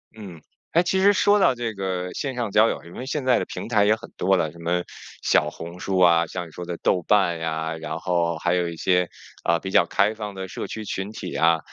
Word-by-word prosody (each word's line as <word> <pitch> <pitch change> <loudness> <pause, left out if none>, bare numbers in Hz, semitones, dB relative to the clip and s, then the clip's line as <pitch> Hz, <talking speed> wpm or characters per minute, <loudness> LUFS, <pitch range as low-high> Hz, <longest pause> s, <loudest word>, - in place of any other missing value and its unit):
嗯。 95 -7 -10 0.3
诶， 170 - +5
其 185 +2 0
实 200 +2 +5
说 205 +1 +4
到 190 - +4
这 120 -3 -4
个 95 -2 -3
线 135 -2 -3
上 120 -4 -2
交 110 +3 +5
友， - - -3
因 85 - -13
为 125 - -6
现 145 +1 -2
在 125 -2 +5
的 - - -1
平 - - -6
台 105 -3 +3
也 105 - +5
很 110 - -12
多 95 +1 +3
了， 80 -3 -1
什 85 - -16
么 85 +1 0 0.4
小 75 - +2
红 85 +3 -9
书 95 -1 -1
啊， 85 -2 +5
像 90 +1 -6
你 - - -15
说 90 +2 -7
的 85 0 -4
豆 90 - +1
瓣 95 -5 +3
呀， 80 0 -3
然 80 +1 -5
后 85 -1 0
还 85 0 +1
有 90 -1 +1
一 85 - -5
些， 90 +1 +2 0.4
呃， 85 0 +3
比 95 - -6
较 - - +4
开 105 +2 +1
放 105 -2 -6
的 95 -1 -6
社 - - -5
区 110 - -6
群 100 0 -4
体 - - -6
啊。 80 0 +3
90 Hz, 270 characters per minute, -24 LUFS, 85-110 Hz, 0.4 s, 诶